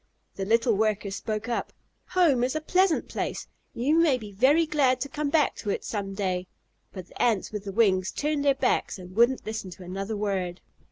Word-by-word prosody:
The 195 - -4
little 230 +2 +3
worker 210 -1 0
spoke 215 +3 -4
up: 240 - -2 0.4
"Home 330 -9 +3
is 255 +4 0
a - - +1
pleasant 365 +1 +2
place. - - -4 0.3
You 285 +7 +2
may 310 -6 +4
be 215 -4 -9
very 270 +11 +4
glad 275 -5 +2
to 280 - -2
come 295 +1 -2
back 300 0 +2
to 210 - -5
it - - -1
some 195 -2 -4
day." 185 -2 -2 0.4
But 185 -3 -9
the - - -7
Ants 225 -5 +1
with 210 -1 -5
the 200 - -4
wings 190 -3 +2
turned 295 -1 -1
their 280 -1 +4
backs 265 -5 0
and 185 0 -11
wouldn't 240 +3 +3
listen 220 -3 -4
to 180 +1 -11
another 195 +4 -4
word. 190 -4 -2
220 Hz, 205 wpm, -26 LUFS, 195-280 Hz, 0.4 s, may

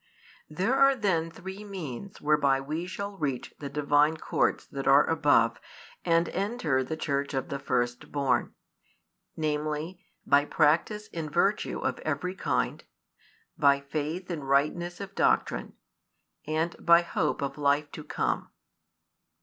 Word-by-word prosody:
|242 155 - -14
There 210 +8 +2
are 275 0 +5
then 185 -8 0
three 190 +4 -8
means 190 - -7
whereby 145 -3 +3
we 155 +6 -4
shall 200 +1 -5
reach 135 -5 -3
the 140 - -5
Divine 150 +2 +2
courts - - 0
that 135 -1 -6
are 140 +2 +7
above 145 -8 +3 0.4
and 170 0 +3
enter 190 - 0
the 160 +4 -4
Church 140 -2 -2
of 135 - -2
the 140 - -3
firstborn; 125 +1 -1 0.8
namely, 155 +3 -2 0.2
by 145 +1 +4
practice 165 +9 +2
in 160 -2 -5
virtue 195 +6 +1
of - - -2
every 180 0 -2
kind, 190 - -1 0.8
by 140 -2 +5
faith 155 +6 -4
in 155 -4 -4
rightness 150 +6 0
of 200 -1 -7
doctrine, - - +1 0.7
and 160 +2 -2
by 170 0 +6
hope 155 -3 -1
of 140 +1 -4
life 145 +1 +2
to - - -8
come. - - -2
155 Hz, 135 wpm, -28 LUFS, 140-180 Hz, 0.8 s, are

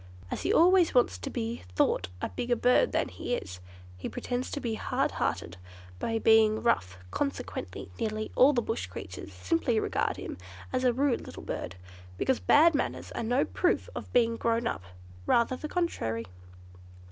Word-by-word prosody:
As - - -3
he - - 0
always 355 -1 +5
wants 240 - +3
to 85 - -5
be 115 +1 -3 0.2
thought 85 - +2
a - - 0
bigger 240 0 -1
bird 250 - +3
than - - +1
he 245 - -3
is, 90 - -7 0.4
he 90 - -5
pretends 250 +1 -3
to - - -3
be 235 -5 -2
hard 220 - 0
hearted 85 +2 -2 0.4
by 225 -1 -1
being 220 -1 +4
rough; 90 - +1
consequently, 280 -1 -4
nearly 215 -1 -2
all 265 +3 +7
the 240 -5 0
Bush 90 - -3
creatures 95 +1 -8
simply 165 - 0
regard - - -1
him - - -7 0.3
as 255 0 +1
a 250 - +5
rude 265 +1 0
little - - -9
bird, 90 - -5 0.4
because 260 - +1
bad 325 +3 +6
manners 290 - -2
are - - -4
no 245 +4 +2
proof 355 - 0
of - - -7
being 230 -1 +3
grown 230 0 0
up; 95 - -2 0.5
rather 235 +2 +3
the 305 - -6
contrary. 115 - -1
235 Hz, 170 wpm, -29 LUFS, -, 0.5 s, all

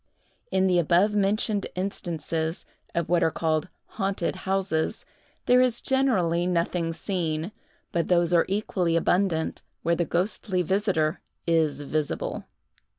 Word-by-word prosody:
In 190 0 +2
the 180 -2 +3
abovementioned 200 +4 +2
instances, 165 -3 -3 0.3
of 170 -1 0
what 175 -1 +2
are - - +4
called 160 0 0 0.2
haunted 195 -4 -2
houses, 190 -5 0 0.4
there 250 0 +5
is 250 -2 +2
generally 185 -11 +1
nothing 170 -1 0
seen; 165 -1 -2 0.4
but 170 -2 0
those 175 -1 +3
are 170 - +4
equally 185 -4 0
abundant 170 -1 +1 0.2
where 170 +1 +2
the 170 - +1
ghostly 185 +1 0
visiter 185 -3 +1 0.2
is 160 -4 +2
visible. 150 +1 -2
175 Hz, 120 wpm, -26 LUFS, 165-195 Hz, 0.4 s, there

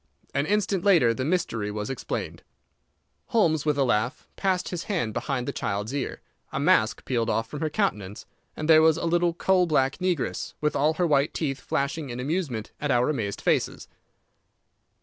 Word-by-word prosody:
An 140 +2 0
instant 205 -3 +1
later 165 - +5
the 120 - -3
mystery 130 - -1
was 105 +3 -4
explained. 135 - -4 0.9
Holmes, 160 - +2
with 150 -1 +2
a 140 - +3
laugh, 115 -1 0
passed 185 -2 0
his 180 -1 -4
hand 165 - -1
behind 125 +1 -2
the - - 0
child's 105 +4 -3
ear, 140 -2 -3 0.3
a - - -2
mask - - +2
peeled 115 -3 0
off 115 0 0
from 150 - -7
her 155 - -1
countenance, 105 - -2 0.3
and 155 - -3
there 160 -1 +7
was 160 0 +5
a - - -3
little 170 0 +2
coal 185 0 +3
black 135 -4 +2
negress, 180 -5 -2
with 150 0 0
all 155 +3 +2
her 180 - +1
white 145 -2 +2
teeth 140 -4 -2
flashing 140 +1 -2
in 120 0 -5
amusement 135 - -2
at 145 - -1
our 125 +2 +3
amazed 100 -8 -3
faces. - - 0
150 Hz, 180 wpm, -26 LUFS, 125-170 Hz, 0.9 s, there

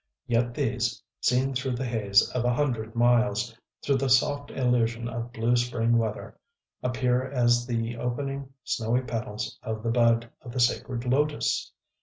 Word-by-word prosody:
Yet 120 +1 0
these, - - -1 0.2
seen 130 +2 +2
through 130 0 -1
the 130 +2 -3
haze 105 -4 +3
of 125 - -1
a 120 - +2
hundred 120 -5 -1
miles, 120 0 +2 0.3
through 140 -1 +2
the 135 0 0
soft 145 +3 +2
illusion 120 -2 0
of 120 0 -5
blue 115 +1 +1
spring 120 -1 +1
weather, 110 -2 -4 0.4
appear 125 0 +1
as 120 -2 +2
the 115 -1 -2
opening 135 +3 -3
snowy 115 +1 0
petals 110 -3 -4
of 110 -1 -4
the 115 - 0
bud 115 -1 +3
of 120 - -9
the 130 - -2
Sacred 120 0 0
Lotos!... 145 +4 +1
120 Hz, 155 wpm, -27 LUFS, 115-125 Hz, 0.4 s, haze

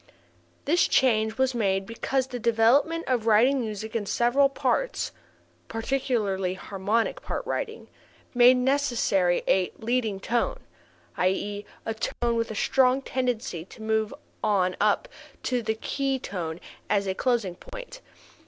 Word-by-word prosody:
This 335 +5 +3
change 220 -4 +2
was 260 0 +2
made 195 -4 0
because 255 +4 -1
the 250 -2 -6
development 240 +9 +3
of 240 -3 0
writing 245 +5 +4
music 220 -1 -5
in 210 -3 -1
several 255 +6 +3
parts - - -1 0.6
(particularly 225 -6 -1
harmonic 205 +4 -1
part - - -4
writing) 455 -1 -4 0.5
made 245 +1 +7
necessary 245 -9 +2
a 185 -1 +2
"leading 225 -3 -1
tone," 235 +4 -1 0.6
i.e., 205 +2 -1 0.2
a 225 - -1
tone 235 +1 -1
with 230 0 -1
a 220 - -5
strong 260 +4 +3
tendency 250 -10 -2
to 220 +3 -12
move 220 -1 0 0.3
on 185 -3 +2
up 210 0 +2 0.4
to 250 -1 0
the 220 0 -1
key 270 +4 -1
tone 175 -8 -5 0.3
as 200 -1 +2
a 190 - -1
closing 230 -4 0
point. - - -10
230 Hz, 135 wpm, -26 LUFS, 205-260 Hz, 0.6 s, made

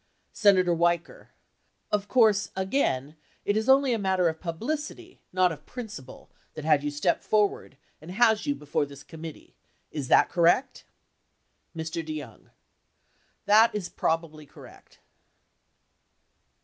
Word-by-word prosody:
Senator 185 -4 +4
Weicker. 170 0 -1 0.6
Of 205 -1 0
course, 215 -5 +3
again, 160 - -1 0.3
it 205 - +1
is 220 +3 -1
only 270 -1 +5
a 230 - -1
matter 190 -3 +1
of 160 0 -6
publicity, 300 - -5
not 185 -1 +3
of 150 -2 -10
principle, 215 - -9 0.2
that 155 - -7
had 150 -3 +3
you 145 - -1
step 145 +4 0
forward 205 -9 0 0.2
and 160 - -12
has 220 +5 +2
you 285 - +1
before 145 - -2
this 140 0 -12
committee, 160 -1 -10 0.4
is 145 -4 -4
that - - +5
correct? 180 +10 +1 0.9
Mr. 160 +1 -4
DeYoung. 150 -7 -8 1.0
That 215 +2 +5
is 195 -4 -3
probably 160 -2 -2
correct. - - -16
180 Hz, 125 wpm, -26 LUFS, 155-215 Hz, 1.0 s, only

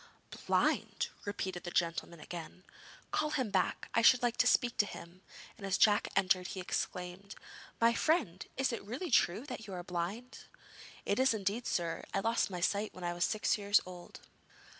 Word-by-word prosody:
'Blind!' - - +1 0.2
repeated 190 -3 -3
the 175 - -4
gentleman 170 -1 -1
again. 175 +3 -8 0.5
'Call 305 - +1
him 260 -8 -1
back. - - 0
I 230 - +4
should 245 +2 +6
like 240 -1 +2
to - - +4
speak 240 -2 +3
to 205 - +3
him,' 175 0 -10 0.4
and 200 - -5
as 195 - +1
Jack 210 -1 +4
entered 185 -1 +3
he 190 - -6
exclaimed: 180 +2 -4 0.4
'My 230 0 +5
friend, 235 - +1
is 265 -1 +1
it - - -3
really 260 - -5
true 225 +2 +3
that 225 -7 -7
you 195 - -7
are 175 - -5
blind?' 185 +8 -5 0.6
'It 200 - +1
is 260 -3 +4
indeed, 210 +4 -2
sir. 165 -1 -1
I - - +3
lost 230 +1 +1
my 180 -2 -5
sight 205 +4 0
when 185 - -9
I 175 0 -1
was 175 0 +1
six 215 0 +1
years 205 +1 +4
old.' 180 -1 -10
200 Hz, 185 wpm, -33 LUFS, 180-230 Hz, 0.6 s, should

